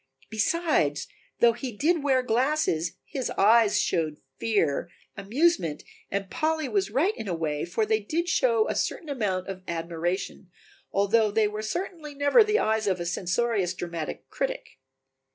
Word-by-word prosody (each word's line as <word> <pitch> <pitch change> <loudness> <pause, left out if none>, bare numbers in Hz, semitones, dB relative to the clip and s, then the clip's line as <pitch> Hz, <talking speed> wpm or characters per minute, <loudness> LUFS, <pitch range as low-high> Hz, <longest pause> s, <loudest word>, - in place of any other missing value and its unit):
Besides, 220 - +1 0.3
though 235 -1 +6
he 245 +2 -5
did 330 +4 +2
wear 265 -2 +2
glasses, 245 - +1
his 260 -4 -3
eyes 220 +1 +5
showed 155 -3 0 0.2
fear, 175 -8 +1 0.3
amusement 200 - +1 0.3
and 195 0 -2
Polly 315 +5 -1
was 395 +4 0
right 360 +11 +1
in 220 - -6
a 180 - -1
way, 150 -2 -2
for 190 +6 0
they 220 0 +2
did 320 +12 -2
show 465 +2 +2
a - - -1
certain 320 - -2
amount 200 -9 -1
of 190 -1 -6
admiration, 170 +3 -3 0.4
although 210 +2 +3
they 215 +1 +2
were 210 +1 -4
certainly 305 - -5
never 285 +11 +5
the 425 0 +2
eyes 220 - +1
of 185 -2 +1
a 175 - -3
censorious 185 +2 0
dramatic 170 -3 -5
critic. - - -4
220 Hz, 155 wpm, -26 LUFS, 180-295 Hz, 0.4 s, though